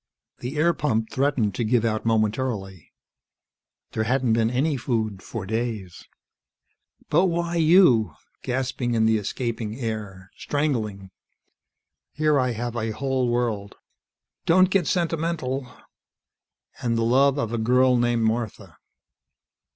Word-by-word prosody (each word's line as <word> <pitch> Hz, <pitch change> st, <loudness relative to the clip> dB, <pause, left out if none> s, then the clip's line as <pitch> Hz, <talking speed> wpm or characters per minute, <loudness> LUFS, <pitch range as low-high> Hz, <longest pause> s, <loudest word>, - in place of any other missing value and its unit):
The 130 Hz, +5 st, -5 dB
air 170 Hz, +3 st, +3 dB
pump 110 Hz, -8 st, -1 dB
threatened 135 Hz, -7 st, +1 dB
to 120 Hz, -, -2 dB
give 115 Hz, +1 st, +2 dB
out 110 Hz, 0 st, -1 dB
momentarily. 110 Hz, -, -1 dB, 1.0 s
There 110 Hz, -, -1 dB
hadn't 125 Hz, 0 st, +1 dB
been 115 Hz, 0 st, +2 dB
any 140 Hz, +5 st, 0 dB
food 110 Hz, -6 st, -2 dB
for 105 Hz, 0 st, -6 dB
days. 110 Hz, -4 st, -4 dB, 1.0 s
"But 170 Hz, +5 st, +4 dB
why 170 Hz, -1 st, -1 dB
you?" 160 Hz, -, +5 dB, 0.3 s
Gasping 125 Hz, -1 st, -2 dB
in 110 Hz, -1 st, +3 dB
the 110 Hz, -1 st, +3 dB
escaping 110 Hz, 0 st, -3 dB
air. 105 Hz, -5 st, -5 dB
Strangling. 110 Hz, -10 st, -2 dB, 1.0 s
"Here 150 Hz, -1 st, +2 dB
I 125 Hz, -1 st, +1 dB
have 120 Hz, +1 st, -4 dB
a 115 Hz, -1 st, -2 dB
whole 130 Hz, +2 st, -1 dB
world 115 Hz, -4 st, -1 dB, 0.4 s
" -, -, -61 dB
"Don't 185 Hz, +2 st, +5 dB
get 185 Hz, -6 st, +2 dB
sentimental 160 Hz, -7 st, -1 dB, 0.5 s
" -, -, -28 dB
"And 115 Hz, -1 st, 0 dB
the 115 Hz, -, +1 dB
love 135 Hz, +4 st, +3 dB
of 115 Hz, -5 st, -2 dB
a 115 Hz, -, -1 dB
girl 125 Hz, +3 st, +3 dB
named 120 Hz, -1 st, +1 dB
Martha." 110 Hz, -, -2 dB
120 Hz, 130 wpm, -24 LUFS, 110-135 Hz, 1.0 s, you